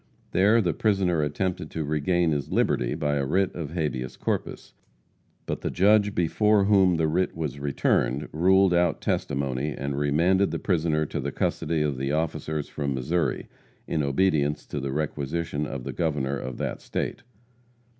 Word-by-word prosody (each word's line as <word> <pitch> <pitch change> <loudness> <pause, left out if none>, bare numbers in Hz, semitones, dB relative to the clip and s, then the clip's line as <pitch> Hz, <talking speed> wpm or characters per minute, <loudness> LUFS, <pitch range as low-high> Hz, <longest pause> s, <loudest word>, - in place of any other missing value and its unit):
There 105 +5 +4
the 85 -5 0
prisoner 95 -6 +1
attempted 75 +2 -2
to 80 - -3
regain 80 +3 +1
his 70 -3 -2
liberty - - +1
by 75 -1 0
a 70 - 0
writ 95 +8 +1
of 80 -5 -5
habeas 75 -7 -3
corpus. - - -3 0.7
But - - -4
the - - -2
judge 105 +2 +3
before 105 +4 +3
whom 95 -3 +4
the 80 -1 +2
writ 90 +4 0
was 75 -4 -3
returned 70 -1 0
ruled 95 +3 +4
out 85 0 +2
testimony, 70 0 -1
and 70 0 -3
remanded 85 +7 +2
the - - -2
prisoner 80 -4 0
to - - -4
the - - -3
custody 80 -1 -1
of 70 -4 -2
the 70 +2 -1
officers 80 -1 -2
from 70 -3 -3
Missouri, 80 +7 -1 0.4
in 80 - -1
obedience 75 0 +1
to 75 - -4
the 70 0 -3
requisition 75 +1 -2
of 70 -2 -5
the - - -5
governor 75 -5 -1
of 65 -2 -5
that - - -3
state. - - -3
75 Hz, 165 wpm, -26 LUFS, 70-90 Hz, 0.7 s, There